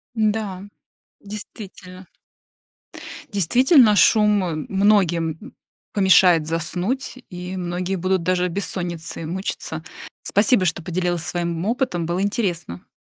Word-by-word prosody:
Да, 210 -4 -1 0.6
действительно. 200 -3 -10 1.3
Действительно, 240 - +4
шум, 210 -2 +4
э, 170 -3 -2
многим 190 - +1 0.4
помешает 185 -5 +5
заснуть, 180 - -2
и 180 +1 -6
многие 180 +1 -3
будут 185 0 0
даже 180 +1 +1
от - - -3
бессонницы 170 -3 -3
мучиться. 165 -2 -4 0.4
Спасибо, 205 0 +3
что 170 0 -1
поделилась 175 0 -2
своим 170 -1 -3
опытом, 220 -7 -1
было 175 +2 -1
интересно. 180 - -2
185 Hz, 100 wpm, -22 LUFS, 175-205 Hz, 1.3 s, помешает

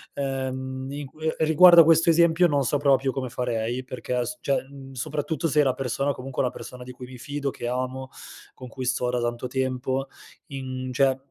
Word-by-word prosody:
ehm, 130 -1 -3
in 145 +1 -5
que 155 +3 -4
riguardo 170 +2 +8
a - - +8
questo 165 +1 +5
esempio, 170 +1 +5
non 145 -3 +1
so 145 - +1
proprio 135 -2 +2
come 130 -1 -4
farei, 120 0 -2
perché 125 -1 -3
s 125 +1 -6
cioè, 140 - 0
mhmm, 135 -1 -12
soprattutto 150 +4 -2
se 150 -1 +3
la 130 -2 +2
persona 135 +2 -1
comunque 135 -1 -4
è - - +2
una 125 - -2
persona 125 0 -9
di 125 - -9
cui 125 0 -10
mi 130 0 -11
fido, 140 +3 -3
che 120 - -6
amo, 130 +1 -3 0.4
con 130 - -10
cui 130 +2 -7
sto 125 0 0
da 125 0 -1
tanto 120 +1 -2
tempo 130 +1 -2 0.4
in 130 -3 -5
cioè 130 +1 +2
130 Hz, 200 wpm, -25 LUFS, 125-145 Hz, 0.4 s, riguardo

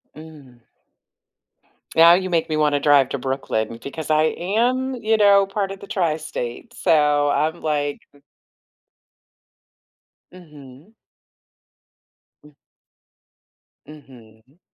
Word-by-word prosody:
Mm. 150 -6 -14 1.4
Now 165 +1 +7
you 185 +1 0
make 165 -2 -1
me 155 - -1
wanna 150 -1 +1
drive 140 -2 +3
to 140 - -3
Brooklyn 125 -4 -3
because 155 +2 -6
I 155 0 +3
am, 245 +8 -1
you 220 -2 0
know, 200 -2 +4
part 195 -1 -3
of 195 - -9
the 200 - -12
tri-state, 155 - -4
so 150 -2 +2
I'm, 155 +4 -1
like, 145 -2 -2
m 145 - -23 2.1
Mhm. 150 - -16 1.5
M 150 - -18 1.3
Mhm. 130 -2 -18
155 Hz, 100 wpm, -21 LUFS, 140-185 Hz, 2.1 s, Now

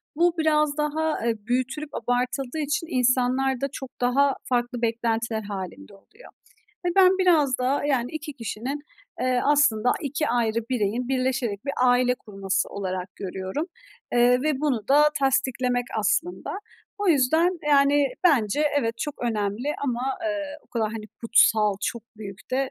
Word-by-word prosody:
bu 345 +2 +3
biraz 305 -2 +2
daha, 305 -2 -1
eee, 230 -1 +1
büyütülüp 260 +5 -1
abartıldığı 250 +3 -1
için 310 +3 -1
insanlar 255 +1 +2
da 275 - +1
çok 265 -2 -7
daha 270 +3 +3
farklı 245 -1 -1
beklentiler 230 -1 -1
hâlinde 190 - -7
oluyor. 200 - -17 0.6
Ve - - +2
ben 375 0 +6
biraz 310 -9 +3
daha, 260 +3 0
yani, 250 -4 0
2 310 -1 -5
kişinin, 250 +3 -5 0.4
eee, 255 -1 +1
aslında 265 -6 +3
2 290 +1 -1
ayrı 230 -2 +1
bireyin 240 +1 -1
birleşerek 255 -5 -1
bir 280 - -2
aile 250 0 +4
kurması 195 -4 -2
olarak 185 -1 -5
görüyorum, 190 - -4 0.5
eee, 245 +1 +4
ve 300 -2 0
bunu 250 -8 -1
da 285 +2 +6 0.2
tasdiklemek 260 -2 +1
aslında. 335 +11 -1 0.5
O 410 -2 0
yüzden, 320 +5 +3
yani, 285 0 +4 0.2
bence 280 - +3 0.2
evet, 230 -4 -1
çok 295 -2 -3
önemli 215 +2 -1 0.2
ama, 245 -2 -1 0.2
eee, 305 -2 -3
o - - -29
kadar, 225 -3 -1
hani, 220 -1 -6
kutsal, 220 -2 +4
çok 235 -2 -2
büyük 200 -2 -10
de 265 +1 0
255 Hz, 145 wpm, -25 LUFS, 230-290 Hz, 0.6 s, ben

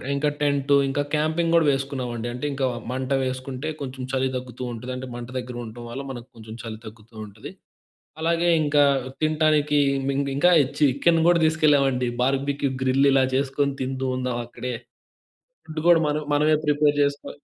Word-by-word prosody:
ఇంకా 150 +1 +1
టెంటు 140 -1 +2
ఇంకా 145 +1 0
క్యాంపింగ్ 160 +2 0
కూడా 165 -2 +4
వేసుకున్నామండి. 130 -4 -3
అంటే 125 +4 -5
ఇంకా 135 -1 -1 0.3
మంట 130 +1 -4
వేసుకుంటే 130 +3 -4
కొంచెం 130 -1 -6
చలి 130 0 +1
తగ్గుతూ 125 0 -8
ఉంటది. 125 +3 -7
అంటే 130 0 -6
మంట 120 0 -7
దగ్గర 125 -1 -7
ఉండటం 120 +2 -9
వల్ల 135 +3 -5
మనకు 120 -1 -8
కొంచెం 110 0 -10
చలి 110 -2 -7
తగ్గుతూ 110 +1 -13
ఉంటది. 105 +1 -11 0.7
అలాగే 170 +1 +2
ఇంకా 145 0 +3 0.4
తినటానికి 155 -1 +2 0.6
ఇంకా 175 +5 +4 0.3
చికెన్ 150 +4 +3
కూడా 175 - +5
తీసుకెళ్ళామండి. 140 -5 +2 0.2
బార్బిక్యూ 140 +1 0
గ్రిల్ 135 +2 +3
ఇలా 135 -1 +4
చేసుకొని 140 +1 0
తింటుందాం 130 -1 -2
అక్కడే. 125 +1 -6 0.9
ఫుడ్ 155 0 -6
కూడా 170 -1 +7
మన 150 +1 0
మనమే 155 +1 +3
ప్రిపేర్ 150 0 +3
చేసుకో 140 0 -2
135 Hz, 150 wpm, -24 LUFS, 125-150 Hz, 0.9 s, కూడా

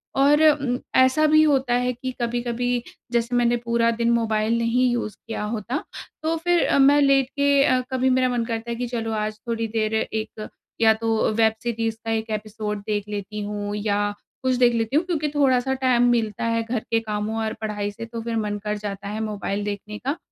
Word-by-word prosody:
और 285 +3 +4
उम, 275 -4 0 0.2
ऐसा 260 +4 +5
भी 310 +1 +6
होता 270 -5 +2
है 250 +1 +1
कि 255 +2 -5
कभी-कभी, 240 0 -1 0.3
जैसे 235 +1 0
मैंने 240 0 +3
पूरा 235 0 +2
दिन 235 0 0
मोबाइल 225 -1 +1
नहीं 235 +2 +2
यूज़ 235 -3 -2
किया 225 -2 -3
होता, 225 +6 -3 0.4
तो 325 +1 +1
फिर 350 -1 +3
अ, - - +2
मैं 285 +2 +6
लेट 275 -2 +4
के 280 -1 +3
अ, 255 -2 +3
कभी 260 0 +2
मेरा 255 0 +3
मन 240 -2 -1
करता 230 0 -4
है - - -2
कि, 245 +1 -3
"चलो, 225 -2 -3
आज 215 0 -3
थोड़ी 230 -1 -1
देर 215 0 0
एक 220 -1 -3 0.3
या 220 -1 +6
तो 225 -1 0
वेब 220 0 +3
सीरीज़ 225 -1 -2
का 225 - -1
एक 220 0 -2
एपिसोड 210 -1 -5
देख 210 -1 -1
लेती 210 0 -5
हूँ 205 0 -4
या 205 0 0 0.3
कुछ 260 -1 +2
देख 240 - +4
लेती 225 +3 -1
हूँ।" 320 +4 +3
क्योंकि 305 -4 -1
थोड़ा-सा 265 -2 +3
टाइम 255 -2 +3
मिलता 220 -3 0
है 230 0 +1
घर 230 +1 -2
के 225 - +3
कामों 215 0 -3
और 220 - -2
पढ़ाई 205 -1 -2
से, 230 +2 -8
तो 230 0 -6
फिर 230 0 -3
मन 210 -1 -1
कर 210 0 -2
जाता 200 -1 -6
है 210 +2 -4
मोबाइल 205 -1 -3
देखने 210 +1 -5
का 280 +4 -1
230 Hz, 205 wpm, -23 LUFS, 215-255 Hz, 0.4 s, भी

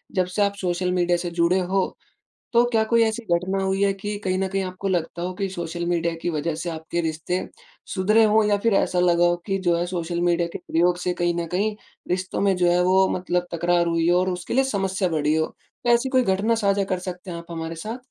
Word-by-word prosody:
जब 185 -1 +2
से 210 - +1
आप 200 - -1
सोशल 180 0 0
मीडिया 175 -1 +2
से 175 0 -3
जुड़े 175 +3 +3
हो, 185 +1 -1 0.6
तो 235 +1 +6
क्या 220 -2 +2
कोई 230 +1 +3
ऐसी 225 +1 -1
घटना 190 +3 -1
हुई 190 +1 +1
है 200 - +3
कि 205 +1 -5
कहीं 185 -1 0
न 190 - 0
कहीं 195 0 -1
आपको 185 +1 -5
लगता 170 -1 -2
हो 180 +1 -3
कि 195 +1 -2
सोशल 175 -1 -4
मीडिया 170 -1 0
की 175 - -1
वजह 155 0 -2
से 175 - -3
आपके 160 +1 -3
रिश्ते, 165 +3 -2 0.5
सुधरे 215 +4 +4
हों 215 0 +4
या 205 - +3
फिर 230 -3 +3
ऐसा 180 - +1
लगा 175 -1 +4
हो 175 0 +3
कि 195 -2 0
जो 170 - +4
है 175 - 0
सोशल 175 -1 -3
मीडिया 175 -1 +2
के - - -3
प्रयोग 175 +1 +1
से 180 0 -1
कहीं 175 0 +2
न 170 -1 -2
कहीं 205 +3 0 0.3
रिश्तों 185 +1 -2
में 195 -2 +3
जो 175 -1 +2
है, 180 0 +3
वो 190 +1 +4
मतलब 180 -1 -1
तकरार 175 +1 +1
हुई 165 0 +1
हो 175 +1 +4
और 185 +1 +1
उसके 180 -1 -4
लिए 265 +2 +4
समस्या 195 -6 -1
बढ़ी 155 -1 +1
हो? 160 0 +2 0.4
तो - - +2
ऐसी 240 +2 +3
कोई 255 -1 +3
घटना 200 +4 +1
साझा 200 -2 +1
कर 185 -1 0
सकते 180 0 -7
हैं 170 - -5
आप 170 - -9
हमारे 165 0 -5
साथ? 220 +9 -5
180 Hz, 245 wpm, -23 LUFS, 175-195 Hz, 0.6 s, तो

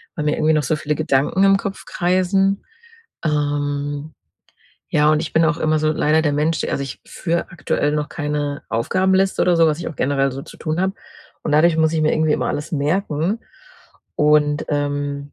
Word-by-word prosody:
weil 150 -4 -3
mir 150 - +1
irgendwie 155 +1 +3
noch 150 - +2
so 150 +4 0
viele 150 0 -2
Gedanken 155 +5 +1
im 195 0 +5
Kopf 195 0 -6
kreisen. 185 +2 +1 0.6
Ähm, 145 0 -2 0.8
ja, 150 0 +4
und 155 - +2
ich 160 - -6
bin 160 +1 +4
auch 165 +1 +1
immer 155 -1 +1
so 155 0 +1
leider 155 +1 +2
der 145 -2 +1
Mensch 155 +3 0
also, 140 - -2
ich 135 - -7
führe 170 -1 -2
aktuell 150 -3 -1
noch 150 -1 -1
keine 145 -1 -3
Aufgabenliste 190 +11 +1
oder 175 -1 +3
so, 165 -1 +5
was 150 +1 -1
ich - - -5
auch 165 - -9
generell 135 0 +1
so 135 +1 -6
zu - - -13
tun 155 +2 -2
habe, 190 +1 0 0.5
und - - -1
dadurch 160 +2 +4
muss 160 0 +2
ich 160 - 0
mir 155 - +2
irgendwie 155 -1 +2
immer - - 0
alles 145 +3 -4
merken 160 +5 0 0.8
und, 150 0 +3
ähm, 145 -1 -2
155 Hz, 190 wpm, -20 LUFS, 145-165 Hz, 0.8 s, im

